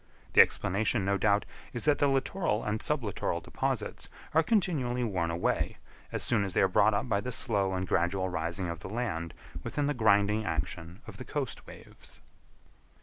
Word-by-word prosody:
The - - +10
explanation, 105 +2 +1
no 100 0 +2
doubt, 105 +1 +3 0.3
is 120 - -3
that 150 -1 +3
the 145 - +4
littoral 135 - 0
and 105 +1 -2
sub 150 -4 0
littoral 100 -4 -2
deposits - - -3 0.2
are 160 - +5
continually 150 - +1
worn 90 -7 -1
away, 85 +1 -1 0.3
as - - -1
soon 115 -4 +3
as 95 -3 -4
they - - +4
are - - +5
brought 105 +2 +4
up 115 - -1
by 100 -4 +1
the 125 - -4
slow 100 -5 0
and 95 0 -2
gradual 95 +3 +1
rising 85 +1 -2
of 85 -1 -4
the 90 - -8
land 100 -8 -3 0.3
within 145 - -1
the 145 - +1
grinding 105 -2 +3
action 85 -4 -4
of - - -10
the - - -6
coast - - -4
waves. - - -13
105 Hz, 185 wpm, -30 LUFS, 95-125 Hz, 0.3 s, The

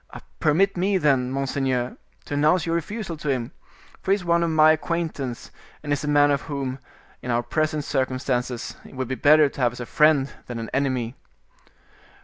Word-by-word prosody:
"Permit 185 +7 +3
me 190 +2 +2
then, 135 -6 +2
monseigneur, 130 -2 -1 0.3
to - - -6
announce 150 +4 +3
your 165 - -1
refusal 170 +2 -3
to 150 -1 -4
him; 130 -1 -1 0.5
for - - -6
he 195 - +6
is 190 -3 -7
one 170 0 +3
of 170 - +1
my 155 -1 +6
acquaintance, 155 -6 -3 0.3
and 145 -1 -1
is 145 - -2
a - - -3
man 145 0 +4
whom, 140 -2 -3 0.4
in 125 - -7
our 120 0 +1
present 155 +4 -1
circumstances, 130 -3 -2
it - - -14
would 130 -1 -3
be 130 - -3
better 150 +3 +5
to 140 - -7
have 120 -1 +2
as 125 - -10
a 120 - -4
friend 150 0 +3
than 120 - -5
an 115 -1 -6
enemy." 130 -3 -1
145 Hz, 185 wpm, -24 LUFS, 130-155 Hz, 0.5 s, he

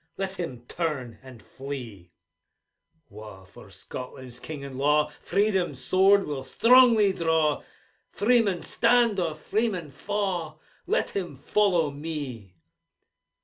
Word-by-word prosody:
Let 195 0 -4
him 125 -9 -5
turn, 140 -9 -3
and 130 -4 -14
flee! 120 -10 -8 1.0
Wha 105 -6 -12
for - - -15
Scotland's 125 -1 -9
king 150 -3 -7
and 135 -1 -8
law 150 +2 +2
Freedom's 195 -8 0
sword 195 +7 +4
will 145 -3 -4
strongly 230 - +5
draw, 160 -4 +1 0.5
Freeman 210 -4 +2
stand, 235 -3 +2
or 165 -3 -1
freeman 185 -1 -2
fa'. 180 0 -3 0.3
Let - - 0
him 180 -7 -4
follow 170 +1 +1
me 140 - -6
160 Hz, 110 wpm, -26 LUFS, 135-195 Hz, 1.0 s, strongly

